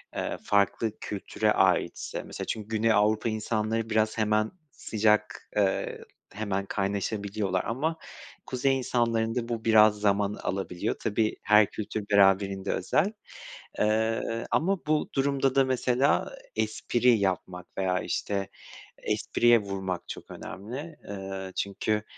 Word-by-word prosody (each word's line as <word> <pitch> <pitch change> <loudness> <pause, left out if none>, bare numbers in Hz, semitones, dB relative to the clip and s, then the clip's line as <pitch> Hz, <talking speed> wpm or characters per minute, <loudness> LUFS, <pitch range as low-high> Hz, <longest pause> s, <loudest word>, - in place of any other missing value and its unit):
eee, - - -2
farklı 100 +2 +2
kültüre 105 +1 -1
aitse 95 -3 +1
mesela - - -6
çünkü 110 -2 -4
Güney 115 0 +1
Avrupa 110 +2 +3
insanları 110 +1 -1
biraz 110 0 +1
hemen 110 0 +1 0.2
sıcak, 105 -1 0
eee, 100 -2 0 0.3
hemen 100 -2 -2
kaynaşabiliyorlar 100 -1 -1
ama 155 +8 -1 0.5
kuzey 135 +1 +1
insanlarında 115 -2 0
bu 115 -2 -3
biraz 110 -2 +6
zaman 100 0 +2
alabiliyor. 95 -3 -3
Tabii, 110 0 0
her 105 0 +6
kültür 110 0 -4
beraberinde 95 -1 +3
özel, 175 - +1 0.7
eee, 110 +2 0
ama 185 +2 +1
bu 155 0 +1
durumda 135 -1 +1
da 135 - +6
mesela 130 - +1 0.2
espri 120 +1 +1
yapmak 90 -2 -2
veya, 95 -1 +1
işte, 100 +2 -2 0.5
espriye 120 -1 +3
vurmak 95 -3 -4
çok - - -8
önemli. 130 - -7
Eee, 95 -1 -5
çünkü, 105 +2 -1
110 Hz, 115 wpm, -28 LUFS, 100-115 Hz, 0.7 s, biraz